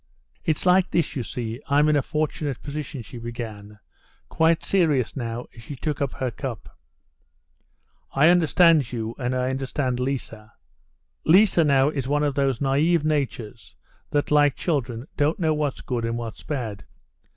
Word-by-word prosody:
"It's 160 +1 -1
like 185 +1 +4
this, 170 - 0
you 135 - -1
see: 115 +1 -5
I'm 145 +2 +4
in 150 - +3
a 145 - +3
fortunate 150 -2 -3
position," 145 -3 -5
she 120 - -10
began, 110 -3 -7 0.5
quite 160 0 +2
serious 155 - +2
now, 120 -2 -4
as 115 - -12
she 140 +6 -8
took 145 +2 -3
up 140 -2 -1
her 130 -2 -2
cup. 125 -4 -7 1.4
"I 145 +4 +5
understand 165 -4 +4
you, 115 -2 -3
and 125 0 -1
I 125 0 0
understand 130 -1 -2
Liza. 115 -4 -4 0.7
Liza 180 0 +5
now 140 -1 +4
is 135 -4 -3
one 145 +1 +1
of 145 -1 +1
those 135 -2 +1
naïve 145 +5 +2
natures 135 -7 -3 0.3
that, 145 0 0
like 145 -2 +4
children, 130 -7 -2
don't 150 +2 +2
know 160 -3 +1
what's 150 -3 -2
good 120 -3 -3
and 115 0 -1
what's 115 -2 -6
bad. 115 -8 -4
135 Hz, 160 wpm, -24 LUFS, 120-150 Hz, 1.4 s, I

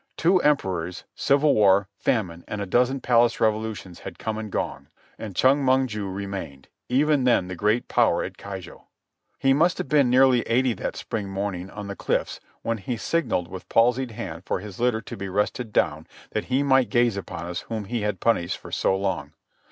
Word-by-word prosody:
Two 180 +3 +4
emperors, 90 - 0
civil 140 +1 +3
war, 100 -2 +4
famine, 90 -8 -1
and 105 - -4
a 100 - -2
dozen 125 +7 +1
palace 120 -1 +3
revolutions 110 -5 -1
had - - -9
come 110 -1 -3
and 110 -2 -6
gone; - - -3 0.3
and 105 -4 -7
Chong 135 +7 +4
Mong 130 0 +3
ju 105 -5 -4
remained, 95 -8 -6 0.2
even 145 +2 +3
then 120 -7 +3
the 95 - -5
great 105 +6 +1
power - - +2
at - - -6
Keijo. 95 -2 -9 0.5
He 135 0 +3
must 165 +5 +3
have - - -3
been 140 -3 +4
nearly 130 -1 +5
eighty 125 +1 +2
that - - -4
spring 105 -4 -4
morning 95 -2 -3
on 105 +1 -7
the 100 0 -6
cliffs - - -1 0.2
when 115 -1 -1
he 115 +5 -3
signalled 155 - -1
with 95 +1 -9
palsied 125 +2 +3
hand 85 -7 -6
for - - -2
his 100 -1 -9
litter 120 -2 +1
to - - -8
be 100 0 -5
rested 105 +4 -1
down 80 -5 0 0.2
that 110 - -2
he 130 +2 +1
might 135 -2 +3
gaze 120 -3 +3
upon 95 -3 -6
us 85 0 -4
whom 110 -3 -3
he 115 +2 -3
had 105 -3 -2
punished 90 -7 +1
for - - -12
so 95 - +1
long. 90 -7 -3
110 Hz, 195 wpm, -25 LUFS, 95-125 Hz, 0.5 s, nearly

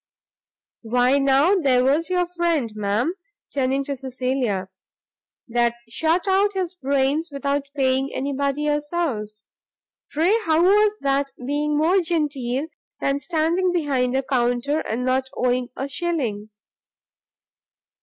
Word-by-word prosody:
Why 245 +4 +2
now 275 +6 +4
there 270 -10 +3
was 290 +6 +2
your 360 -1 +1
friend, 340 -9 -1
ma'am," 215 - 0 0.4
turning 270 0 0
to 280 0 -4
Cecilia, 255 -6 -2 0.8
"that 235 0 +1
shot 325 - 0
out 395 +2 +3
his 370 -3 -2
brains 280 +1 0
without 280 0 -2
paying 265 0 +1
any 280 +2 -3
body 280 +2 -1
a 295 0 +1
souse; 240 -11 -3 0.7
pray 330 +7 +2
how 320 +1 +3
was 420 +3 +4
that 275 0 +1 0.2
being 295 +2 0
more 345 +5 +3
genteel 290 -6 -1 0.3
than 275 0 0
standing 335 +4 0
behind 270 -7 0
a 270 - +1
counter, 255 +3 0
and 250 -3 -3
not 260 +1 0
owing 250 0 0
a 270 - -3
shilling?" 270 -9 -2
280 Hz, 125 wpm, -23 LUFS, 255-325 Hz, 0.8 s, now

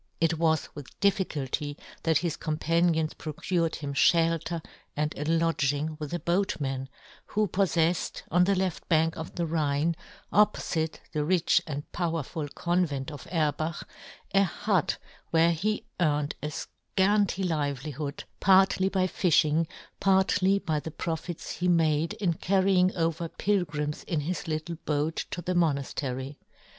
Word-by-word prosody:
It 165 -1 +1
was 160 -1 +2
with 145 -3 -11
difficulty 150 -7 0 0.2
that 160 -2 +3
his 170 -2 -1
companions 160 +1 +1
pro 155 - -6
cured 170 +1 0
him 145 -2 -5
{helter 165 +1 +2 0.3
and 150 0 0
a 150 - -3
lodging 155 -2 +1
with 150 -2 -5
a 175 - 0
boatman, 145 -8 -1 0.4
who 215 0 +1
poiTefled, 175 -3 +1
on 180 +1 +5
the 200 +1 +3
left 185 -2 -2
bank 160 -1 +3
of 160 0 -7
the 170 - 0
Rhine, 155 0 +1 0.4
oppofite 170 -6 +2 0.2
the 150 -2 0
rich 175 +1 +3
and 145 -2 -4
powerful 165 -3 -2
convent 160 -4 -1
of 145 - -9
Erbach, 155 0 0 0.5
a 195 - +6
hut 190 -1 0 0.3
where 165 +1 +4
he 210 +6 -1
earned 150 -3 +1
a 150 - -2
fcanty 195 +5 0
livelihood, 145 -2 -3 0.2
partly 190 0 +5
by 190 -1 +1
fifhing, 165 -3 +2 0.3
partly 190 0 +3
by 160 -6 -1
the 160 - -6
profits 165 +1 -4
he 180 - 0
made 160 -2 +2
in 185 -5 0
carry 190 +3 +2
ing 180 0 +4
over 165 -1 0
pilgrims 155 -8 -1
in 160 -4 -1
his 170 +4 -3
little 160 +1 -3
boat 150 +2 -1
to 175 - -5
the 180 - -1
monaftery. 140 -4 -1
165 Hz, 140 wpm, -28 LUFS, 150-180 Hz, 0.5 s, a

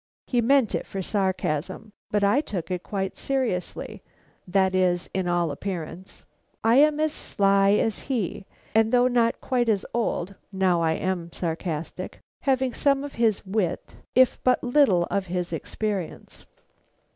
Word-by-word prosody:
He 245 -2 +1
meant 260 -1 +3
it - - -2
for 195 -1 -4
sarcasm, 190 0 -2 0.2
but 205 -1 +1
I 205 +8 +4
took 190 - -5
it 180 -1 -2
quite 195 -1 -4
seriously, 255 -10 -2 0.5
that 190 0 +2
is 180 -1 +1
to 190 -1 -1
all 175 -2 +1
appearance. 180 +2 -6 0.4
I 230 +2 +5
am 300 +1 +5
as 310 0 +2
sly 195 0 +2
as 220 +1 +1
he, 205 -6 -2 0.3
and 220 0 +3
though 250 0 +5
not 240 -2 +2
quite 245 -3 0
as 205 -3 +1
old 200 -5 -1 0.2
now 190 -3 +2
I 160 -1 +2
am 175 -1 -2
sarcastic 165 -2 -4 0.3
have 265 -1 +3
some 275 -1 +2
of 285 - -7
his 220 -4 +2
wits, 190 -3 -2 0.2
if 255 0 +4
but 255 0 +3
little 245 -9 +4
of 195 -1 -1
his 180 -1 -3
experience. 195 +2 -4
195 Hz, 150 wpm, -25 LUFS, 180-240 Hz, 0.5 s, I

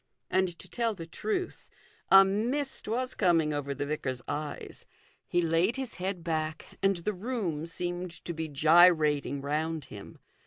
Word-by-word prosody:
And 185 -2 +1
to 185 - -10
tell 225 +4 -1
the 165 - -7
truth 370 - -4 0.4
a 195 0 +9
mist 240 +9 -1
was 250 +4 -1
coming 165 -6 +2
over 140 -1 -3
the 145 +1 -3
vicar's 130 -4 -3
eyes. 145 0 -5 0.4
He 175 0 +1
laid 165 +7 +2
his 265 -3 -5
head 185 -1 -3
back, 160 -1 -3
and 195 0 +3
the 190 +5 -2
room 185 -7 -3
seemed 175 +1 -3 0.2
to 170 - -2
be 160 -1 -4
gyrating 150 -2 +4
round 155 +1 -2
him. 100 -1 -10
170 Hz, 155 wpm, -29 LUFS, 155-195 Hz, 0.4 s, a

